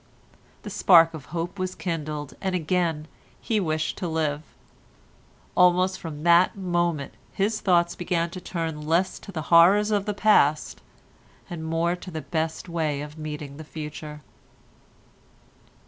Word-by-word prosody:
The 210 Hz, -, -7 dB
spark 170 Hz, -4 st, +6 dB
of 150 Hz, -5 st, -8 dB
hope 175 Hz, +4 st, -5 dB
was 185 Hz, 0 st, -3 dB
kindled, 150 Hz, -4 st, -4 dB
and 190 Hz, -2 st, -1 dB
again 165 Hz, -2 st, -1 dB, 0.3 s
he 220 Hz, -2 st, 0 dB
wished 155 Hz, -4 st, -2 dB
to 185 Hz, -, -2 dB
live. 155 Hz, -2 st, -1 dB, 1.1 s
Almost 180 Hz, +1 st, +4 dB
from 155 Hz, -3 st, -7 dB
that 170 Hz, +3 st, +4 dB
moment 175 Hz, -6 st, -1 dB, 0.2 s
his 210 Hz, +2 st, -1 dB
thoughts 175 Hz, -3 st, +3 dB
began 170 Hz, -1 st, -1 dB
to 185 Hz, -, -8 dB
turn 165 Hz, -3 st, -4 dB
less 175 Hz, +4 st, +1 dB
to -, -, -11 dB
the 160 Hz, -4 st, -4 dB
horrors 200 Hz, +6 st, +6 dB
of 205 Hz, 0 st, 0 dB
the 210 Hz, -, -1 dB
past, 155 Hz, -9 st, +3 dB, 0.7 s
and 165 Hz, -2 st, -5 dB
more 165 Hz, +2 st, 0 dB
to 180 Hz, -, -10 dB
the 160 Hz, -3 st, -5 dB
best 160 Hz, +1 st, -3 dB
way 155 Hz, -4 st, -2 dB
of 150 Hz, +1 st, -9 dB
meeting 150 Hz, -2 st, -6 dB
the 155 Hz, -, -8 dB
future. 150 Hz, -1 st, -8 dB
170 Hz, 145 wpm, -25 LUFS, 155-185 Hz, 1.1 s, spark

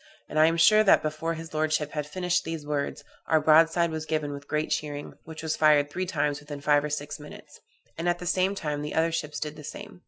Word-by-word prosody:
_' -, -, -27 dB, 0.2 s
and 155 Hz, -, -2 dB
I 155 Hz, -, +7 dB
am 165 Hz, +1 st, +1 dB
sure 215 Hz, +6 st, +6 dB
that 205 Hz, -, +5 dB
before 155 Hz, +2 st, -2 dB
his 160 Hz, 0 st, -9 dB
lordship 155 Hz, -1 st, 0 dB
had 150 Hz, -1 st, -3 dB
finished 180 Hz, +2 st, 0 dB
these 160 Hz, -2 st, -5 dB
words, 145 Hz, -1 st, -3 dB, 0.2 s
our 160 Hz, -, +4 dB
broadside 165 Hz, +2 st, +4 dB
was 160 Hz, 0 st, -5 dB
given 155 Hz, -2 st, -1 dB
with 140 Hz, 0 st, -8 dB
great 155 Hz, 0 st, -2 dB
cheering, 145 Hz, -1 st, -3 dB
which 160 Hz, 0 st, -9 dB
was 160 Hz, -1 st, -1 dB
fired 150 Hz, -2 st, +4 dB
three 185 Hz, +4 st, -3 dB
times 150 Hz, -4 st, -1 dB
within 145 Hz, -1 st, -8 dB
five 145 Hz, 0 st, +3 dB
or 150 Hz, -, -3 dB
six 145 Hz, 0 st, -4 dB
minutes; 150 Hz, 0 st, -12 dB, 0.4 s
and 170 Hz, +1 st, 0 dB
at 175 Hz, -, +1 dB
the 180 Hz, -, -8 dB
same 185 Hz, +2 st, +1 dB
time 150 Hz, -5 st, -3 dB
the 150 Hz, 0 st, -5 dB
other 165 Hz, +1 st, +2 dB
ships 150 Hz, -2 st, -3 dB
did 150 Hz, 0 st, -5 dB
the 150 Hz, -, -10 dB
same. 205 Hz, +5 st, -9 dB
155 Hz, 245 wpm, -27 LUFS, 150-165 Hz, 0.4 s, I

